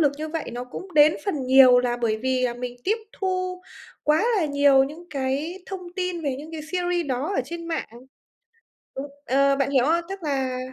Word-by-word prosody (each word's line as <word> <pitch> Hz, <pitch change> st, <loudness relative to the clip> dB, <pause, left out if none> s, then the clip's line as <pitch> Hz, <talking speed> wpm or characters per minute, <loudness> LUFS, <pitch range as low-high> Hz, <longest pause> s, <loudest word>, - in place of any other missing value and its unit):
lực 290 Hz, -3 st, +4 dB
như 310 Hz, +1 st, -4 dB
vậy 320 Hz, -4 st, -4 dB
nó 245 Hz, +1 st, -5 dB
cũng 360 Hz, +7 st, -9 dB
đến 300 Hz, +1 st, +6 dB
phần 300 Hz, -9 st, -1 dB
nhiều 255 Hz, -1 st, +8 dB
là 245 Hz, -1 st, 0 dB
bởi 230 Hz, -3 st, 0 dB
vì 255 Hz, +1 st, 0 dB
là 240 Hz, -1 st, 0 dB
mình 245 Hz, 0 st, -6 dB
tiếp 430 Hz, +4 st, +2 dB, 0.2 s
thu 370 Hz, -1 st, -2 dB, 0.4 s
quá 305 Hz, +7 st, +3 dB
là 370 Hz, -, +2 dB
nhiều 285 Hz, -2 st, +4 dB
những 310 Hz, +5 st, -9 dB
cái 285 Hz, +7 st, -2 dB
thông 365 Hz, -2 st, -7 dB
tin 360 Hz, -2 st, -2 dB
về 275 Hz, -4 st, -1 dB
những 310 Hz, +3 st, -10 dB
cái 315 Hz, -, -5 dB
series 350 Hz, 0 st, -1 dB
đó 270 Hz, +8 st, -2 dB
ở -, -, +2 dB
trên 335 Hz, +4 st, -7 dB
mạng. 330 Hz, -, -3 dB, 1.1 s
Đúng 275 Hz, +2 st, -4 dB, 0.2 s
ờ, 275 Hz, +2 st, +3 dB
bạn 275 Hz, 0 st, 0 dB
hiểu 260 Hz, -3 st, +3 dB
không? 335 Hz, +3 st, +2 dB
Tức 390 Hz, -1 st, -7 dB
là 265 Hz, -4 st, -1 dB
295 Hz, 205 wpm, -24 LUFS, 260-345 Hz, 1.1 s, nhiều